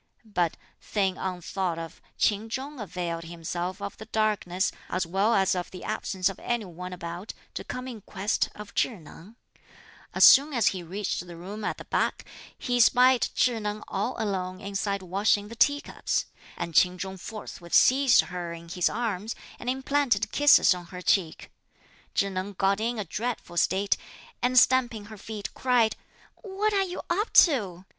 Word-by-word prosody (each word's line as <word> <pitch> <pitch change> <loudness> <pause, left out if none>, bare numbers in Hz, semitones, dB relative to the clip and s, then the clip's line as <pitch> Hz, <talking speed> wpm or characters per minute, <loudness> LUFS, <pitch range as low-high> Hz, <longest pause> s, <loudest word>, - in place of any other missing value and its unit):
But, 180 -6 -1 0.2
thing 195 -3 0
unthought 185 -1 -3
of, 165 0 -8 0.2
Ch'in 215 +1 +1
Chung 270 +4 -5
availed 170 -4 -4
himself 175 +3 -5
of 200 - -5
the 220 - -10
darkness, 210 -4 0 0.2
as 185 -1 -1
well 195 +6 +2
as 190 0 +3
of 180 -1 -3
the 185 - -10
absence 195 -3 -1
of 195 - -3
any 240 -3 -2
one 180 +1 -8
about, 175 +2 -6 0.2
to - - -5
come 255 +1 -6
in 235 -4 -7
quest 200 +2 -1
of 210 0 -10
Chih 235 - 0
Neng. 170 +7 -14 0.8
As - - +4
soon 285 +2 +8
as 230 -4 +4
he 185 - -5
reached 185 +1 -4
the 170 -1 -10
room 200 +5 -7
at - - -2
the - - -10
back, - - -1 0.3
he 245 0 -1
espied 250 +1 +5
Chih 240 -3 +2
Neng 210 0 -3
all 205 +6 -2
alone 185 -4 -2
inside 200 0 -2
washing 205 +3 +1
the 230 - -8
tea 285 +4 +3
cups; - - -2 0.3
and 170 - -4
Ch'in 180 +3 +4
Chung 190 +1 -5
forthwith 185 -4 -6
seized 265 0 +6
her 175 -2 -5
in 170 0 -10
his 180 0 +1
arms 220 -2 -3 0.2
and 245 - -4
implanted 265 -4 +1
kisses 290 -8 +6
on 175 -1 -8
her 180 +1 -9
cheek. 175 -5 0 0.6
Chih 200 0 +1
Neng 190 +2 -4
got 195 +1 +1
in 235 +2 -1
a 210 - -3
dreadful 220 0 -4
state, 190 +3 +2 0.4
and 255 +1 +1
stamping 245 -4 +4
her - - -10
feet, 210 -1 -6
cried, 245 -4 +2 0.4
"What 420 0 -2
are 395 - +3
you 360 -1 -6
up 410 +6 0
to?" 195 - +4
200 Hz, 175 wpm, -27 LUFS, 180-235 Hz, 0.8 s, soon